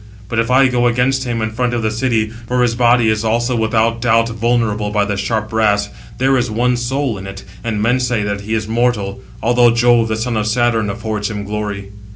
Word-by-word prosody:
But 115 - -1
if 115 +1 0
I 135 +1 +5
go 120 -1 +1
against 130 +2 +1
him 115 -2 -2
in 110 - -2
front 120 +2 -1
of 115 - -2
the 110 - 0
city—for 115 +1 -1
his 120 -1 +1
body 120 -1 +3
also 120 +3 0
is 120 - -1
without 115 +1 +1
doubt 115 -1 +2
vulnerable 115 -2 0
by 105 -1 +1
the 100 0 -2
sharp 110 +2 -2
brass, 105 -2 +1 0.3
there 135 +1 +2
is 125 -1 0
one 125 +3 +1
soul 120 -2 -2
in 95 - -8
it, 100 0 -8 0.2
and 110 -3 -2
men 125 +3 +2
say 125 -4 0
that 100 0 -3
he 110 +2 -2
is 110 -1 -2
mortal; 110 -4 -1 0.2
although 120 +1 +4
Jove, 120 0 +3
the 110 - -1
son 115 0 -2
of 105 0 -1
Saturn, 115 -2 +1
affords 110 0 -3
him 105 -2 -4
glory." 100 -1 -5
115 Hz, 215 wpm, -17 LUFS, 105-120 Hz, 0.3 s, I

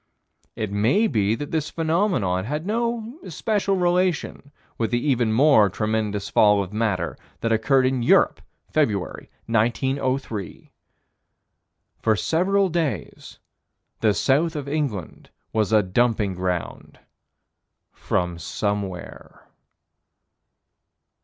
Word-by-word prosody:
It 110 -3 -3
may 115 - +2
be 110 - +1
that 145 +5 -6
this 155 -2 -1
phenomenon 160 - 0
had 150 +6 -3
no 235 - -2
especial 195 +3 -1
relation 175 -5 0 0.3
with 115 - 0
the 120 - +1
even 120 -5 +2
more 115 -4 +5
tremendous 105 0 -2
fall 105 -1 +4
of 95 +2 -10
matter 110 -3 -1 0.3
that 115 - 0
occurred 130 +4 +3
in 130 -1 +1
Europe, 120 - +3 0.3
February, 110 -12 -1 0.2
1903. 120 -1 -1 1.3
For 110 -1 +2
several 190 - +1
days, 155 - -3 0.6
the 105 -2 +2
south 155 +5 +2
of 145 -2 -4
England 140 - -3 0.2
was 110 -1 +1
a 110 -1 +5
dumping 105 0 +1
ground 90 -1 -4 0.9
from 90 -1 -2
somewhere. 95 +2 -5
120 Hz, 105 wpm, -23 LUFS, 105-160 Hz, 1.3 s, more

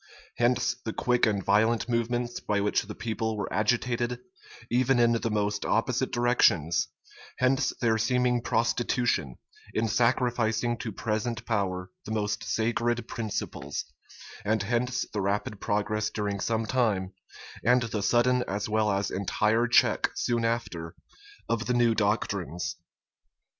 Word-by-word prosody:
Hence 120 0 +2
the 110 - -3
quick 125 -1 +2
and 100 -3 -1
violent 110 +3 +3
movements 120 0 -1
by 105 -1 -1
which 105 +1 +1
the 105 0 -8
people 110 -1 -2
were 100 - -3
agitated, 120 +2 0 0.5
even 130 +2 +3
in 120 -1 +4
the 115 0 0
most 105 -1 -1
opposite 125 +3 0
directions: 120 -10 +3 0.5
hence 130 +1 +2
their 110 -2 +2
seeming 125 +1 +2
prostitution, 115 - 0 0.4
in 115 +1 +1
sacrificing 120 0 +1
to 115 -2 -4
present 115 +2 -2
power 95 -4 -1
the 110 - -6
most 105 0 -1
sacred 120 +1 0
principles: 110 -4 -4 0.6
and 110 0 +1
hence 125 +4 0
the 105 - -1
rapid 100 +1 -2
progress 105 +1 0
during 100 -2 -3
some 115 +1 0
time, 105 -6 0 0.5
and 125 +2 +4
the 110 -2 -3
sudden 120 +4 +3
as 100 +2 -2
well 110 -1 +1
as 100 0 -1
entire 110 +4 +1
check 120 - +4
soon 120 -1 0
after, 100 -8 -2 0.5
of 115 0 -1
the 125 - +1
new 120 -1 +4
doctrines. 100 -6 -1
115 Hz, 135 wpm, -28 LUFS, 105-120 Hz, 0.6 s, in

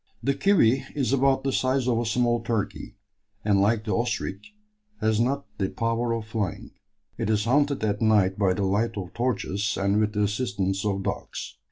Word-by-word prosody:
The 140 - +2
"kiwi" 135 - +3
is 135 -2 0
about 135 0 +3
the 135 - 0
size 130 0 +1
of 120 -2 +2
a 120 - -1
small 120 0 +1
turkey, 110 -1 -3 0.5
and, 100 -2 +3
like 110 +2 +2
the 105 - -1
ostrich, 115 - -3 0.4
has 110 0 +1
not 135 +4 0
the 95 -1 0
power 115 +1 -1
of 115 -2 -3
flying. 110 -1 -4 0.5
It 115 - -1
is 105 -1 +1
hunted 140 +1 +2
at 105 0 0
night 105 -3 +3
by 95 -3 +3
the 100 - -1
light 105 +4 0
of 95 0 -6
torches 105 -5 -1
and 100 +2 +2
with 105 -1 +1
the 105 0 +1
assistance 100 -3 -1
of 100 -2 -1
dogs. - - -5
110 Hz, 185 wpm, -26 LUFS, 100-125 Hz, 0.5 s, kiwi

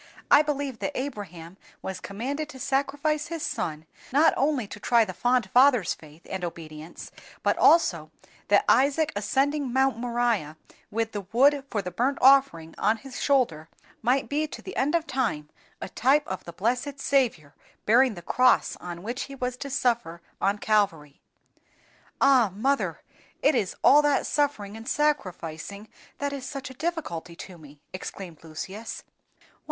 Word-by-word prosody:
I 290 - +8
believe 285 -5 -3
that 290 - -3
Abraham 190 - -6 0.3
was 190 -1 -5
commanded 270 +11 -4
to 265 -3 -11
sacrifice 285 +3 -1
his 330 -2 -5
son 155 -1 -3 0.3
not 300 +5 +5
only 275 -4 +1
to 210 - -10
try 235 +1 +3
the 185 - -6
fond 245 +1 +1
father's 250 - +5
faith 155 +1 -16
and 190 -1 -5
obedience, 160 -1 -8 0.3
but - - +2
also 170 - +4 0.4
that 205 0 +4
Isaac 285 +5 +3
ascending 270 +6 0
Mount 265 -2 +2
Moriah 235 -10 -1 0.3
with 225 +1 -2
the 205 -4 -6
wood 275 +4 +4
for 205 -3 -2
the 180 - -5
burnt 255 +9 0
offering 265 -12 +4
on 220 +2 +2
his 265 +2 -9
shoulder, 225 - +1 0.3
might 255 +4 +1
be 300 +2 -1
to - - -10
the 380 - -8
end 295 +5 +1
of 330 -1 +1
time 215 - -2 0.3
a - - -5
type 270 +9 +2
of 190 - -5
the 170 - -9
blessed 250 - -2
Saviour 240 - 0 0.3
bearing 240 +1 +4
the 175 - -10
cross 255 +7 +3
on 175 0 -8
which 240 +4 -4
He 275 - -10
was 250 -1 -3
to 280 +1 -6
suffer 240 -10 0 0.2
on 200 +1 +2
Calvary." 190 -10 0 1.0
"Ah! 260 -7 +5
mother, 270 +6 0 0.4
it 290 - +5
is 205 -8 -1
all 295 - +7
that 290 -1 +2
suffering 245 -9 -1
and 225 +1 -10
sacrificing 200 - -2 0.3
that 285 0 -2
is 275 -2 -6
such 275 0 -6
a - - -10
difficulty 260 - -4
to 180 0 -10
me!" 145 -1 -15
exclaimed 185 -3 -8
Lucius. 190 +8 -7
240 Hz, 160 wpm, -26 LUFS, 185-275 Hz, 1.0 s, I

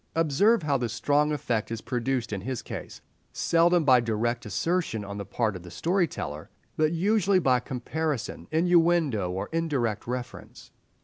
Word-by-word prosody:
Observe 165 +7 +3
how 140 -3 +1
the 120 -1 -1
strong 145 +6 +1
effect 120 -7 -1
is 115 -1 -4
produced 125 -1 -2
in 100 - -3
his 130 +3 -4
case: - - -8 0.3
seldom 170 0 +3
by 130 -3 +6
direct 120 +1 -1
assertion 120 - -1
on 100 +1 -6
the 100 - -5
part 110 +1 -1
of 90 - -7
the 90 - -11
story 175 - +1
teller, 75 - -6 0.3
but 155 0 +2
usually 195 +2 +2
by 130 -8 +3
comparison, 135 +2 -4
innuendo, 165 - +3
or 95 +2 -3
indirect 140 -12 -1
reference. 125 0 -7
130 Hz, 160 wpm, -27 LUFS, 115-165 Hz, 0.3 s, by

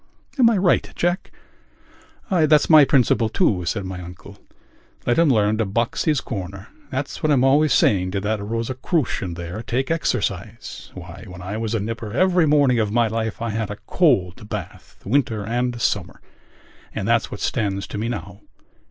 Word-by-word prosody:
Am 235 -2 +7
I 225 - +2
right, 185 -1 +2
Jack?" 175 +2 -1 1.0
"That's 155 -4 +4
my 155 -2 +9
principle, 125 -4 +3
too," 90 -4 +1
said 100 +3 -2
my 95 -1 -6
uncle. 90 0 -11 0.7
"Let 120 +5 +2
him 165 -2 +5
learn 110 -3 +2
to 110 - +2
box 115 +5 -1
his 150 -4 +2
corner. 100 -1 -6 0.2
That's 135 +2 -4
what 155 - +2
I'm 130 -3 +3
always 145 +2 +4
saying 90 -5 +3
to 100 - -1
that 105 +1 -1
Rosicrucian 115 - -2
there: 85 +4 -6
take 130 +5 -2
exercise. 110 - -3
Why, - - -10
when 90 -1 -10
I 100 +4 -4
was 115 0 -2
a - - +1
nipper 115 +1 -5
every 180 +2 +3
morning 140 -5 +4
of 105 -2 0
my 120 +1 +3
life 110 +1 -3
I 115 - -2
had 110 -1 -2
a 105 - -6
cold 105 - +1
bath, 100 -5 -8
winter 110 -3 0
and 120 +1 -1
summer. - - -1 0.8
And 100 - -3
that's 115 -1 +2
what 100 - -7
stands 100 -4 -1
to 105 - -6
me 115 +2 -2
now. 100 -3 -6
115 Hz, 175 wpm, -22 LUFS, 100-135 Hz, 1.0 s, my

